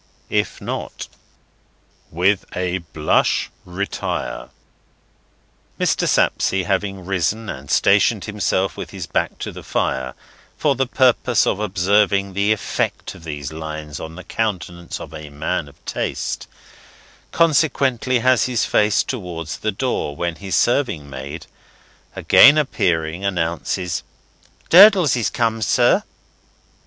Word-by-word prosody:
If - - 0
Not, - - -5 1.0
WITH 90 +4 +1
A 90 0 -1
BLUSH 80 -2 0
RETIRE. 95 +3 -4 1.3
Mr. - - +1
Sapsea 95 -1 +1
having 95 -1 -2
risen 100 +4 -1
and 65 +1 -7
stationed 100 - +3
himself 95 -4 -1
with - - -7
his - - -6
back - - -2
to - - -5
the - - -10
fire, 65 -1 -2 0.4
for 145 - +2
the 135 0 -1
purpose 125 -2 +3
of 100 - 0
observing 100 0 +1
the 100 +2 +1
effect 110 - -2
of - - -14
these 75 -3 -6
lines 75 -1 -6
on 80 0 -8
the 95 - -9
countenance 90 -4 -4
of - - -9
a 75 -1 -8
man 80 +3 -3
of 70 - -16
taste, - - -3 0.8
consequently 135 -6 +2
has 130 -1 +3
his 125 -3 0
face 105 -1 +2
towards 85 - -5
the 110 - -1
door, 100 - -2
when 85 +1 -3
his 95 -1 -3
serving 105 - +1
maid, 70 +4 -7 0.7
again 145 +2 +7
appearing, 85 - 0
announces, 85 -1 -2 0.7
"Durdles 185 - +8
is 120 -3 0
come, 115 -1 -1
sir!" 105 - +3
95 Hz, 125 wpm, -20 LUFS, 80-115 Hz, 1.3 s, Durdles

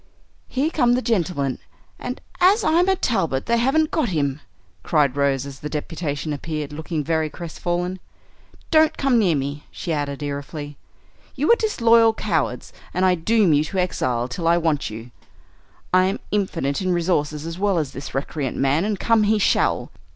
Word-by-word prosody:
"Here 285 +5 -1
come 245 -7 +3
the 250 - 0
gentlemen, 170 - 0 0.4
and, 250 +1 -5 0.2
as 395 +5 +5
I'm 345 +4 +3
a 380 - +4
Talbot, 165 - 0
they 235 0 +2
haven't 290 +6 +2
got 305 -8 +1
him!" 145 -4 -1 0.4
cried 145 -5 +2
Rose 140 -2 +1
as 140 -1 -9
the 150 - -5
deputation 150 0 -3
appeared, 150 0 -4
looking 155 0 -3
very 160 +1 0
crestfallen. 175 +3 -3 0.7
"Don't 315 -1 +4
come 270 -4 +3
near 180 -7 +3
me," 140 +1 -4
she 170 - -4
added, 145 -1 -3
irefully, 145 +1 -5 0.6
"you 290 - +2
are - - +8
disloyal 230 - +4
cowards, 160 - -2 0.2
and 185 +1 +2
I 185 - +5
doom 185 +1 +3
you 145 +1 +3
to 190 - -5
exile 125 -9 0
till 165 +7 -3
I 170 +1 +5
want 160 -4 0
you. 115 +3 -9 0.8
I 185 0 +5
am 190 - -1
infinite 180 -9 -1
in 185 -1 +1
resources 160 -3 0
as 165 +2 -6
well 200 -2 +2
as 150 -5 -1
this 135 +1 -8
recreant 140 0 -3
man, 140 +6 +2
and 210 -2 -2
come 230 -1 +3
he 215 +1 +3
shall. 205 - +1
165 Hz, 175 wpm, -22 LUFS, 145-220 Hz, 0.8 s, are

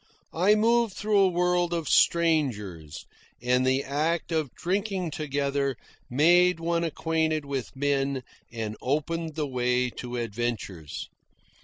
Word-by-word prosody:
I 190 +6 +4
moved 230 -1 +2
through 210 -1 +2
a 195 - +6
world 175 0 +1
of 165 -3 -2
strangers, 115 - +1 0.3
and 125 +1 +2
the 130 +1 +2
act 155 +5 -1
of 155 -5 0
drinking 190 -1 -2
together 140 -2 -1 0.3
made 175 +6 +4
one 170 0 0
acquainted 160 -2 -1
with 140 -2 -4
men 135 -1 0 0.3
and 110 -2 -4
opened 155 +3 -2
the 155 -2 -1
way 125 -1 0
to 125 +1 -7
adventures. 110 -8 -4
150 Hz, 125 wpm, -27 LUFS, 125-170 Hz, 0.3 s, a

